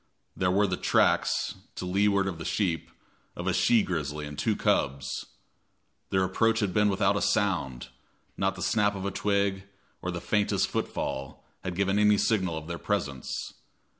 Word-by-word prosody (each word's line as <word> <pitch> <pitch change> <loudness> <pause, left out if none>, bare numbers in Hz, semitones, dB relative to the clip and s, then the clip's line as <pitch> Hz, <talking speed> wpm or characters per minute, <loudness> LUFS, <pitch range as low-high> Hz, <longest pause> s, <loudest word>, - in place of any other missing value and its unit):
There 90 - +1
were 100 +3 +3
the 90 -2 -1
tracks, - - +2 0.2
to - - -5
leeward 100 +1 +2
of 90 -4 -4
the - - -5
sheep, 85 -5 -1 0.5
of - - -5
a - - +1
she 115 -3 +4
grizzly 75 -3 -3
and 75 0 -7
two 105 +9 0
cubs. 70 -5 0 0.8
Their 95 -1 +2
approach 115 +5 +2
had 100 -5 0
been 105 -1 +4
without 100 +1 +2
a 100 - 0
sound; 70 - 0 0.5
not 95 0 0
the 90 - -5
snap 105 0 +2
of 95 0 -5
a 100 - -1
twig, 100 -1 0 0.4
or 90 - -3
the 85 -1 -3
faintest 105 +4 +1
footfall, 65 0 -3 0.2
had 90 -2 -3
given 100 +2 +1
any 105 0 +5
signal 95 -7 +1
of 80 - -6
their 85 +1 -5
presence. 75 -11 -3
95 Hz, 170 wpm, -28 LUFS, 85-100 Hz, 0.8 s, any